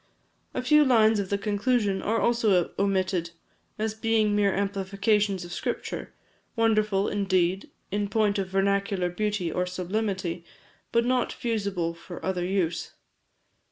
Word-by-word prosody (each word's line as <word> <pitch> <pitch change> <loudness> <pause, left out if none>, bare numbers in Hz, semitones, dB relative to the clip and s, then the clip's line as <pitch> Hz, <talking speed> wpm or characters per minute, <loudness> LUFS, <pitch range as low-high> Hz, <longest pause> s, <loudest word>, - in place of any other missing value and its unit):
A - - -1
few 300 +4 +6
lines 225 -5 +4
of 195 -2 -3
the 200 - +1
conclusion 205 0 0
are 225 +2 0
also 215 -7 +2
omitted, 190 -3 0 0.5
as 220 0 -1
being 220 -1 +1
mere 205 -1 +3
amplifications 200 0 0
of 175 - -8
Scripture - - -4 0.4
wonderful, 215 -3 +2
indeed, 190 - 0 0.2
in 205 0 -1
point 210 -1 +1
of 190 - -1
vernacular 195 -1 +1
beauty 205 -3 -1
or 180 +2 -1
sublimity, 185 -1 -2 0.5
but 235 0 +2
not 250 0 +1
fusible 200 -7 -2
for 170 +1 -9
other 185 -2 -1
use. 180 -2 -1
200 Hz, 130 wpm, -26 LUFS, 185-215 Hz, 0.5 s, few